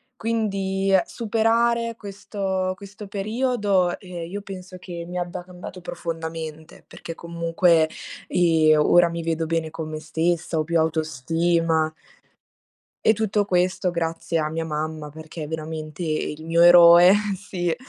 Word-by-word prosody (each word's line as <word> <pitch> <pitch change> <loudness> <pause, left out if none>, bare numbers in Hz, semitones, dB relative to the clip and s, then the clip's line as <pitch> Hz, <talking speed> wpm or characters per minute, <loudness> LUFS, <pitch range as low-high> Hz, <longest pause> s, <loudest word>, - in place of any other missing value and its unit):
quindi 195 -4 -1
superare 230 +1 +1
questo 195 -2 -3
questo 205 +1 -10
periodo, 205 -3 0
ehm, 175 -3 -7
io 205 - -4
penso 185 -2 -9
che 175 -2 -7
mi 180 +1 -5
abbia 175 0 -4
cambiato 180 0 -10
profondamente, 160 -2 -6
perché 165 - -8
comunque, 170 -1 +2 0.4
ehm, 160 -3 +4
ora 175 +3 +5
mi 170 0 -4
vedo 165 0 -1
bene 165 -1 -1
con 155 0 -6
me 155 0 -5
stessa, 165 +2 -1
ho - - +1
più 165 +1 +1
autostima. 160 +1 0 1.1
E 220 - +6
tutto 210 -1 0
questo 180 0 +1
grazie 165 -1 -2
a 155 - 0
mia 165 0 -2
mamma, 155 -1 -4
perché 160 +2 -10
è - - -6
veramente 155 +1 -5
il 155 -1 -3
mio 165 +1 +2
eroe, 175 +2 +8 0.2
sì. 175 -3 -3
170 Hz, 135 wpm, -23 LUFS, 160-195 Hz, 1.1 s, eroe